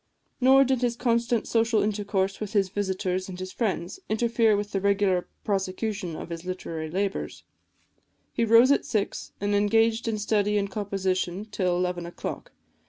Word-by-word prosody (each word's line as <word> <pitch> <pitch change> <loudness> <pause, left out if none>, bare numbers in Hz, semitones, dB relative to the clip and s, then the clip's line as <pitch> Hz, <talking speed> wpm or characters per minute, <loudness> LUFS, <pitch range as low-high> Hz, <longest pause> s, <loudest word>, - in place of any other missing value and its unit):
Nor 265 +1 +6
did 260 -2 0
his 240 -1 +1
constant 235 -1 +1
social 225 -1 +2
intercourse 200 -2 -1
with 215 0 -5
his 195 -3 +2
visitors 190 -1 -2
and 185 -1 -7
friends 200 - -2
interfere 225 -1 +2
with 205 0 -4
the 195 - -1
regular 200 -2 +2 0.2
prosecution 195 -2 -2
of - - -7
his 165 0 -5
literary 165 -3 -5
labours: 195 +3 -3 0.9
he 235 - 0
rose 230 +4 +6
at 280 - +3
six, 210 -4 -2
and 205 +1 -1
engaged 225 +3 +2
in 220 -1 0
study 210 0 +1
and 200 -1 -1
composition 190 -2 -2
till 185 -4 -1
eleven 180 -1 -2
o'clock. - - -6
205 Hz, 155 wpm, -26 LUFS, 190-225 Hz, 0.9 s, Nor